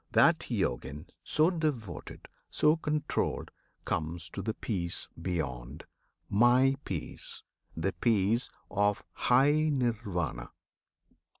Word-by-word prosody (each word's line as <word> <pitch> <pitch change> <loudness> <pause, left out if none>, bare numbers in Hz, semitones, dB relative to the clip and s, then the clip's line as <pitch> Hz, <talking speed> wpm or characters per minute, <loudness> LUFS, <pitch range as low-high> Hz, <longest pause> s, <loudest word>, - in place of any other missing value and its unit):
That - - +4
Yojin, 65 +6 -2 0.2
so 160 +3 +3
devoted, 135 - -3 0.2
so 150 +1 +4
controlled, 150 -2 -1 0.3
Comes 80 +1 -3
to 95 - -4
the 110 +3 -2
peace 85 -6 -2
beyond, 70 -7 -3 0.4
My 125 +5 +5
peace, 85 -6 -5 0.3
the 95 +4 0
peace 110 +5 +2 0.2
Of 105 0 +1
high 145 +5 +4
Nirvana! 105 - -1
105 Hz, 95 wpm, -30 LUFS, 85-130 Hz, 0.4 s, My